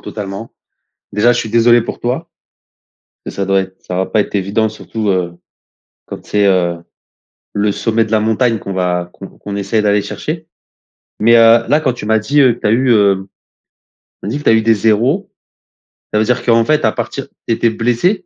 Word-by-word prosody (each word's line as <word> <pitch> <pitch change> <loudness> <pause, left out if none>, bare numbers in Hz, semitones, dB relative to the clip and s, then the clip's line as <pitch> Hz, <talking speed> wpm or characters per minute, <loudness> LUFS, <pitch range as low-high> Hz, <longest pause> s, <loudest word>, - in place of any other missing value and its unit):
totalement. 100 +1 -7 0.6
Déjà, 110 +4 +3
je - - -1
suis - - -3
désolé 120 +1 +4
pour - - -7
toi. 135 +8 -3 1.0
Ça 100 - -3
doit 95 0 +2
être 95 0 -9
ça 90 - -5
va 95 +1 0
pas 110 - 0
être 105 - -5
évident, 100 +3 0
surtout, 110 0 -5
heu, 90 -2 0 0.7
quand - - -9
c'est, 105 -1 +1
heu, 90 -3 +1 0.8
le 105 0 0
sommet 115 +2 0
de 110 - -9
la 110 - +3
montagne 110 +2 +1
qu'on 100 - -6
va 90 -1 -1
qu'on 95 - -10
qu'on 100 -1 -8
essaye 100 +2 -1
d'aller 105 -1 +2
chercher. - - -6 0.7
Mais, 115 +2 +4
heu, 115 0 +5
là, 145 +5 +3
quand 130 -5 0
tu 120 - -8
m'as 110 +1 +2
dit, 140 +8 +2
heu, 125 -3 +3
tu - - -1
as - - +2
eu, 125 +3 +2
heu, 100 -3 +2
tu - - -53 0.8
m'as - - -4
dit 120 - -2
que 145 - -10
tu - - +4
as - - +5
eu 110 - +3
des 115 0 +3
0, 120 - +1 0.8
ça 105 - +2
veut 110 - +2
dire 125 +2 0
qu'en 115 -1 +4
fait, 155 0 +1
à 110 - +3
partir - - -5 0.2
tu 115 - +2
étais 115 +1 +1
blessé, 125 - 0
110 Hz, 205 wpm, -15 LUFS, 100-120 Hz, 1.0 s, heu